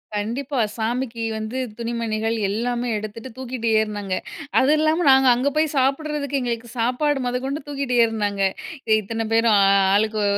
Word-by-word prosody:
கண்டிப்பா. 250 +6 -2 0.2
சாமிக்கு 230 +1 -2
வந்து 220 +4 -4 0.2
துணிமணிகள் 230 -1 -2
எல்லாமே 240 +3 -1
எடுத்துட்டு 215 +4 -7
தூக்கிட்டு 250 -3 -3
ஏறுனாங்க. 205 -3 -3 0.5
அது 270 +3 +3
இல்லாம 315 +2 +2
நாங்க 265 0 +5
அங்க 265 +4 +1
போய் 310 -1 +1
சாப்பிடறதுக்கு, 280 +1 0
எங்களுக்கு 235 -1 -3
சாப்பாடு 255 +3 0
மொதக்கொண்டு 265 +4 -3
தூக்கிட்டு 275 -3 -2
ஏறுனாங்க. 205 -3 -2 0.5
எ - - +7
இத்தன 225 +2 -4
பேரும் 225 -1 +4
அ, - - +5
அ - - +5 0.2
ஆளுக்கு 215 0 +1
240 Hz, 145 wpm, -22 LUFS, 220-270 Hz, 0.5 s, எ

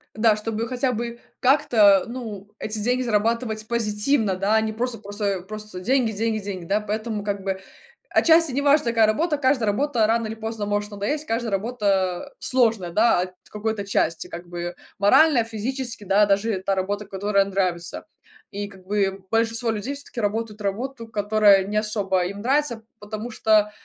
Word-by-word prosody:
Да, 220 -1 +4
чтобы 225 +1 -3
хотя 255 +1 -1
бы 235 +1 -4 0.2
как-то, 230 -8 +5
ну, 220 -5 -7
эти 215 0 -3
деньги 250 +4 +1
зарабатывать 225 -1 0
позитивно, 220 -1 +1
да, 195 +3 +1
а 220 - +5
не 220 0 -2
просто 235 +1 -2
просто 205 0 -6
э, 195 -2 0
просто 215 -1 -8
деньги, 240 +3 +1
деньги, 220 +1 -1
деньги, 190 -3 -5
да? 200 +5 +1
Поэтому, 215 0 -3
как 200 -1 -3
бы, 190 0 -3 0.5
отчасти 330 -2 +5
не 270 +3 -1
важно, 285 -2 +3
какая 225 -2 +4
работа, 300 +8 +1
каждая 260 -5 +1
работа 235 +1 +1
рано 225 +1 +1
или 220 - -5
поздно 220 -1 -4
может 205 +1 -2
надоесть, 210 +10 -2
каждая 230 -2 -2
работа 200 +1 -1
сложная, 225 -8 +2
да, 220 0 +3
от 185 0 -5 0.2
какой-то 210 -1 -3
части, 165 -4 0
как 175 +1 -9
бы. 175 0 -5 0.2
Морально, 250 +5 +5
физически, 230 +1 -4
да, 200 +2 +4
даже 200 0 +1
та 195 - +1
работа, 200 +2 -2
которая 200 0 +1
нравится. 185 -3 -2 0.5
И 205 0 -4
как 190 -2 -16
бы 195 -1 -1
большинство 230 +1 +1
людей 220 +6 -3
всё-таки 280 -3 -8
работают 210 0 -2
работу, 230 +4 -4
которая 205 -2 +4
не 210 +2 -2
особо 200 -4 +1
им 200 +3 -5
нравится, 255 -2 0 0.2
потому 215 +2 -6
что, 215 -1 +3
215 Hz, 170 wpm, -23 LUFS, 200-235 Hz, 0.5 s, как-то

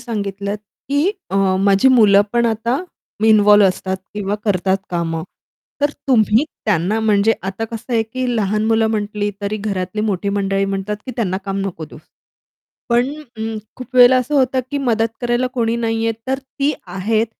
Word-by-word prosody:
सांगितलत 200 -3 -4 0.3
की 290 +7 +2 0.2
अ, 195 - -1 0.2
माझी 200 +5 +4
मुलं 210 -6 +6
पण 235 0 +2
आता 235 - -1 0.4
इन्व्हॉल्व 210 -1 +6
असतात 190 0 -1 0.2
किंवा 205 -1 -2
करतात 190 -2 +1
कामं. 165 -2 -2 0.6
तर 290 - +2 0.2
तुम्ही 225 0 +4 0.2
त्यांना 205 +2 +1
म्हणजे 215 0 +3
आता 195 +3 -3
कसं 230 +2 -6
आहे 225 -1 +3
की 255 +4 -4
लहान 210 0 0
मुलं 225 0 +3
म्हटली, 210 -1 -2
तरी 205 +1 -2
घरातली 200 -1 -3
मोठी 200 -2 -1
मंडळी 195 -1 0
म्हणतात 195 +1 -3
की, - - -3
"त्यांना 190 -6 0
काम 195 -1 -3
नको 165 -4 -6
देऊस." 150 - -13 0.9
पण 240 +3 +2 0.3
अं, 220 0 -3 0.2
खूप 255 0 -10
वेळेला 250 +1 +8
असं 265 +4 -1
होतं 260 -1 +2
की 285 - -1
मदत 225 -1 +2
करायला 240 +1 +1
कोणी 230 -3 0
नाहीये, 225 -1 0 0.2
तर 265 0 0
ती 275 +2 -2
आहेत. 215 +5 0
215 Hz, 160 wpm, -19 LUFS, 195-235 Hz, 0.9 s, वेळेला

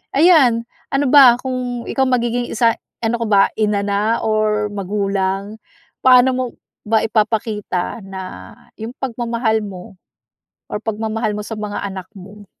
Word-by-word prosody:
Ayan, 275 -8 +5 0.3
ano 275 +1 +1
ba? 265 -5 +8
Kung 250 -2 -4
ikaw 265 -1 0
magiging 240 -1 0
isa 230 0 +2 0.3
ano 225 +1 +1
ka - - 0
ba, 200 -2 +5 0.2
inana 210 +1 0
or 215 -1 0
magulang? 200 +1 -2 0.4
Paano 255 0 +6
mo 255 - 0 0.4
ba 220 0 +2
ipapakita 215 -2 -1
na 190 -1 -8 0.3
yung 230 +4 -6
pagmamahal 235 -3 -1
mo 185 -1 -10 0.7
or 210 - -4
pagmamahal 220 -1 -2
mo - - -3
sa 225 - -6
mga 210 -1 -4
anak 190 -2 -6
mo? 200 +2 -12
220 Hz, 135 wpm, -19 LUFS, 205-240 Hz, 0.7 s, ba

